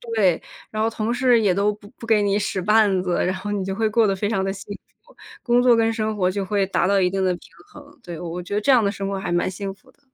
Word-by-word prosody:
对， 185 Hz, -6 st, +2 dB, 0.3 s
然 215 Hz, -, -2 dB
后 220 Hz, -, +2 dB
同 225 Hz, 0 st, -2 dB
事 245 Hz, -1 st, +3 dB
也 200 Hz, -4 st, +3 dB
都 200 Hz, +3 st, +1 dB
不 205 Hz, 0 st, -15 dB
不 230 Hz, -, -10 dB
给 220 Hz, -2 st, +4 dB
你 200 Hz, 0 st, +1 dB
使 195 Hz, -2 st, -2 dB
绊 210 Hz, -2 st, +3 dB
子， 180 Hz, -1 st, -1 dB
然 185 Hz, +1 st, -1 dB
后 205 Hz, +2 st, -5 dB
你 200 Hz, -2 st, -2 dB
就 195 Hz, 0 st, -3 dB
会 220 Hz, +1 st, 0 dB
过 220 Hz, 0 st, +3 dB
得 195 Hz, -, +1 dB
非 205 Hz, +2 st, -2 dB
常 195 Hz, -4 st, 0 dB
的 195 Hz, -, -2 dB
幸 200 Hz, +1 st, -8 dB, 0.3 s
福， -, -, -22 dB, 0.3 s
工 240 Hz, 0 st, +3 dB
作 245 Hz, -1 st, +5 dB
跟 225 Hz, 0 st, +2 dB
生 220 Hz, -1 st, -2 dB
活 185 Hz, -3 st, +1 dB
就 195 Hz, 0 st, -3 dB
会 200 Hz, 0 st, 0 dB
达 190 Hz, -1 st, 0 dB
到 200 Hz, -1 st, +3 dB
一 180 Hz, -, +2 dB
定 195 Hz, +1 st, -2 dB
的 185 Hz, -, +2 dB
平 175 Hz, -, -15 dB, 0.3 s
衡。 290 Hz, -1 st, -16 dB
对， 175 Hz, -6 st, -8 dB
我 175 Hz, +1 st, -6 dB
我 180 Hz, +1 st, -5 dB
觉 180 Hz, +3 st, -5 dB
得 210 Hz, -, 0 dB
这 275 Hz, -, +3 dB
样 250 Hz, -3 st, +5 dB
的 200 Hz, -, +1 dB
生 200 Hz, -1 st, -4 dB
活 195 Hz, -1 st, -3 dB
还 180 Hz, -, -3 dB
蛮 175 Hz, +2 st, 0 dB
幸 195 Hz, +1 st, -5 dB
福 195 Hz, -, -24 dB
的。 -, -, -37 dB
205 Hz, 325 characters per minute, -22 LUFS, 190-220 Hz, 0.3 s, 作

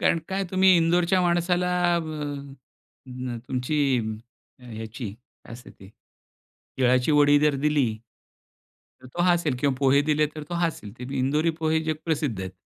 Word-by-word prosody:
कारण 165 Hz, -, +2 dB
काय 195 Hz, +1 st, -1 dB
तुम्ही 190 Hz, 0 st, +5 dB
इंदोरच्या 175 Hz, +2 st, +2 dB
माणसाला 175 Hz, +1 st, +1 dB, 0.3 s
अ, -, -, 0 dB, 1.1 s
न 125 Hz, -1 st, -6 dB
अ, -, -, -5 dB
तुमची 130 Hz, +4 st, -2 dB, 0.9 s
ह्याची, 110 Hz, -2 st, -7 dB, 0.3 s
काय -, -, -12 dB
असत 120 Hz, +1 st, -11 dB
ते? 95 Hz, -, -13 dB, 0.9 s
तीळाची 125 Hz, +2 st, +3 dB
वडी 145 Hz, 0 st, +5 dB
जर 150 Hz, -1 st, +3 dB
दिली 150 Hz, -3 st, +2 dB, 1.2 s
तर 130 Hz, -, -12 dB
तो 175 Hz, -, 0 dB
हसेल 170 Hz, -7 st, +2 dB
किंवा 140 Hz, -2 st, +1 dB
पोहे 140 Hz, 0 st, +4 dB
दिले 150 Hz, 0 st, +2 dB
तर 155 Hz, -, -7 dB
तो 175 Hz, -, -4 dB
हसेल. 165 Hz, -12 st, -2 dB
त्यात 125 Hz, +2 st, -7 dB
इंदोरी 150 Hz, +5 st, +1 dB
पोहे 160 Hz, 0 st, +1 dB
जग 155 Hz, 0 st, 0 dB
प्रसिद्ध 145 Hz, -, -1 dB
आहेत 95 Hz, 0 st, -6 dB
150 Hz, 150 wpm, -25 LUFS, 125-170 Hz, 1.2 s, तुम्ही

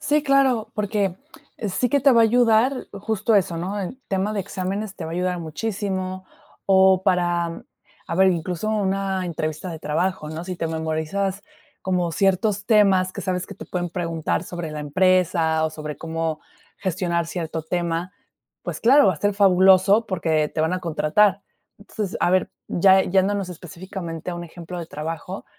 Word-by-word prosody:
Sí, 295 Hz, +1 st, +1 dB
claro, 270 Hz, -5 st, +2 dB
porque 205 Hz, -3 st, -1 dB, 0.5 s
sí 250 Hz, +7 st, 0 dB
que 280 Hz, +4 st, +2 dB
te 275 Hz, 0 st, +5 dB
va 230 Hz, -, +5 dB
a -, -, +7 dB
ayudar 240 Hz, +2 st, +3 dB
justo 215 Hz, +2 st, -1 dB
eso, 180 Hz, -4 st, +2 dB
¿no?, 195 Hz, +4 st, -3 dB
en 195 Hz, +8 st, -5 dB
tema 195 Hz, +2 st, 0 dB
de 205 Hz, -, -1 dB
exámenes 195 Hz, +2 st, -4 dB
te 170 Hz, -, -7 dB
va 160 Hz, -, -6 dB
a -, -, -3 dB
ayudar 180 Hz, 0 st, -1 dB
muchísimo, 185 Hz, +2 st, -4 dB, 0.4 s
o 190 Hz, -1 st, +5 dB
para, 175 Hz, -3 st, 0 dB, 0.4 s
a -, -, -3 dB
ver, 190 Hz, +2 st, +5 dB
incluso 175 Hz, +3 st, -2 dB
una 195 Hz, -2 st, 0 dB
entrevista 155 Hz, +1 st, -4 dB
de 160 Hz, -, -6 dB
trabajo, 160 Hz, +1 st, -2 dB
¿no? 160 Hz, +2 st, -6 dB
Si 185 Hz, 0 st, -4 dB
te 165 Hz, -, -2 dB
memorizas 160 Hz, +5 st, -2 dB, 0.4 s
como 180 Hz, -2 st, 0 dB
ciertos 200 Hz, +2 st, +1 dB
temas 195 Hz, -4 st, +4 dB
que -, -, -6 dB
sabes 180 Hz, -1 st, -2 dB
que -, -, -9 dB
te -, -, -10 dB
pueden 175 Hz, -1 st, -3 dB
preguntar 165 Hz, -2 st, -2 dB
sobre 175 Hz, -3 st, -6 dB
la 150 Hz, -, -5 dB
empresa 165 Hz, 0 st, +2 dB
o 160 Hz, -, -1 dB
sobre 150 Hz, -1 st, -6 dB
cómo 165 Hz, -1 st, -3 dB, 0.4 s
gestionar 175 Hz, -3 st, -1 dB
cierto 165 Hz, -2 st, -4 dB
tema, 170 Hz, +2 st, -2 dB, 0.5 s
pues -, -, -5 dB
claro, 265 Hz, +1 st, +6 dB
va 190 Hz, -, +4 dB
a -, -, -11 dB
ser 205 Hz, +6 st, 0 dB
fabuloso 195 Hz, +2 st, +5 dB
porque 160 Hz, -5 st, 0 dB
te 155 Hz, -, -3 dB
van 160 Hz, +3 st, +1 dB
a 185 Hz, -, -1 dB
contratar. 180 Hz, +5 st, +2 dB, 0.4 s
Entonces, 205 Hz, -1 st, -5 dB
a 175 Hz, -, +3 dB
ver, 185 Hz, 0 st, +2 dB, 0.2 s
ya 190 Hz, +2 st, +5 dB
yéndonos 195 Hz, +1 st, +1 dB
específicamente 175 Hz, 0 st, -7 dB
a -, -, -4 dB
un 175 Hz, -, -6 dB
ejemplo 170 Hz, +1 st, -8 dB
de 165 Hz, -, -7 dB
trabajo, 165 Hz, +5 st, -6 dB
185 Hz, 175 wpm, -23 LUFS, 165-200 Hz, 0.5 s, a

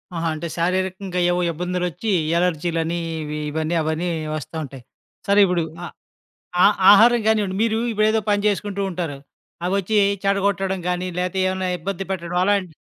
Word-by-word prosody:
ఆహా! 165 Hz, 0 st, -1 dB
అంటే, 170 Hz, +2 st, -5 dB
శారీరకంగా 185 Hz, +1 st, -1 dB
ఏవో 180 Hz, -, 0 dB
ఇబ్బందులొచ్చి 180 Hz, +4 st, -3 dB, 0.3 s
అలెర్జీ‌లని, 170 Hz, -1 st, 0 dB, 0.2 s
ఇవి 150 Hz, 0 st, -4 dB
ఇవని, 160 Hz, +2 st, -2 dB
అవని 160 Hz, +3 st, -1 dB, 0.3 s
వస్తా 155 Hz, +2 st, -7 dB
ఉంటయి. 135 Hz, -3 st, -10 dB, 0.4 s
సరే 200 Hz, +1 st, +4 dB
ఇప్పుడు 180 Hz, -2 st, 0 dB, 0.2 s
ఆహ్, 175 Hz, -, -8 dB, 0.7 s
ఆ -, -, +8 dB, 0.3 s
ఆహారం 230 Hz, +3 st, +6 dB
గానివ్వండి. 205 Hz, -3 st, +1 dB
మీరు 225 Hz, -1 st, +1 dB
ఇప్పుడేదో 215 Hz, 0 st, +2 dB
పని 205 Hz, 0 st, +2 dB
జేసుకుంటూ 200 Hz, -1 st, -1 dB
ఉంటారు. 170 Hz, -5 st, -4 dB, 0.5 s
అవొచ్చి 200 Hz, +3 st, 0 dB, 0.3 s
చెడగొట్టడం 195 Hz, -1 st, 0 dB
గాని, 180 Hz, +1 st, -1 dB
లేతే 180 Hz, +1 st, -1 dB
ఏవన్నా 185 Hz, 0 st, -2 dB
ఇబ్బంది 195 Hz, +2 st, -4 dB
పెట్టడం 175 Hz, -1 st, -3 dB
అలాంటి 190 Hz, -4 st, 0 dB
180 Hz, 140 wpm, -22 LUFS, 170-200 Hz, 0.7 s, ఆ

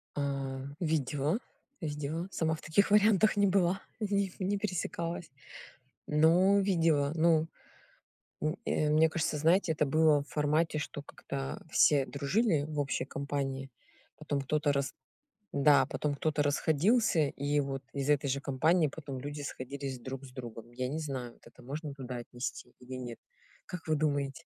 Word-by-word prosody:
А, 135 Hz, -2 st, -2 dB, 0.2 s
видела, 155 Hz, -, 0 dB, 0.4 s
сделала, 150 Hz, +3 st, -3 dB
сама 160 Hz, -1 st, 0 dB
в -, -, -12 dB
таких 200 Hz, +7 st, +2 dB
вариантах 210 Hz, 0 st, +5 dB
не 200 Hz, 0 st, +4 dB
была, 185 Hz, 0 st, +2 dB, 0.2 s
неп 200 Hz, -3 st, 0 dB
не 195 Hz, +2 st, 0 dB
пересекалась. 170 Hz, -4 st, -3 dB, 0.8 s
Но 175 Hz, +6 st, +5 dB
видела, 165 Hz, -7 st, +2 dB
ну, 160 Hz, -1 st, +3 dB, 0.9 s
м, 155 Hz, 0 st, -1 dB
э, 155 Hz, -, +1 dB
мне 155 Hz, +1 st, +5 dB
кажется, 160 Hz, -1 st, -1 dB
знаете, 165 Hz, +3 st, +3 dB
это 150 Hz, -2 st, +1 dB
было 155 Hz, 0 st, +4 dB
в 140 Hz, -, -16 dB
формате, 155 Hz, +1 st, +1 dB
что 145 Hz, -1 st, -5 dB
как-то 135 Hz, -1 st, -6 dB
все 140 Hz, -4 st, +4 dB
дружили 150 Hz, +3 st, +1 dB
в 150 Hz, -1 st, -5 dB
общей 140 Hz, -2 st, -1 dB
компании, 135 Hz, -1 st, -3 dB, 0.5 s
потом 145 Hz, -2 st, -2 dB
кто-то 145 Hz, +2 st, +1 dB
рас 140 Hz, -1 st, -1 dB, 0.6 s
да, 140 Hz, 0 st, +5 dB
потом 150 Hz, -1 st, -2 dB
кто-то 150 Hz, +1 st, 0 dB
расходился, 160 Hz, -, +2 dB
и 145 Hz, +2 st, 0 dB
вот 135 Hz, -1 st, -3 dB
из 140 Hz, 0 st, -2 dB
этой 145 Hz, -1 st, +3 dB
же 140 Hz, -, 0 dB
компании 155 Hz, +5 st, +2 dB
потом 140 Hz, -2 st, -7 dB
люди 145 Hz, +1 st, -5 dB
сходились 135 Hz, -1 st, -5 dB
друг 130 Hz, +2 st, -6 dB
с 130 Hz, -, -11 dB
другом. 120 Hz, -2 st, -8 dB
Я 125 Hz, +1 st, -2 dB
не 150 Hz, +4 st, -3 dB
знаю, 130 Hz, -6 st, -4 dB
вот -, -, -25 dB
это -, -, -16 dB
можно 145 Hz, +3 st, -5 dB
туда 130 Hz, -2 st, -6 dB
отнести 120 Hz, +1 st, -6 dB
или 125 Hz, +1 st, -8 dB
нет? 125 Hz, -2 st, -6 dB, 0.5 s
Как 180 Hz, -3 st, -7 dB
вы 155 Hz, -1 st, +2 dB
думаете? 145 Hz, -3 st, -1 dB
150 Hz, 155 wpm, -31 LUFS, 140-165 Hz, 0.9 s, вариантах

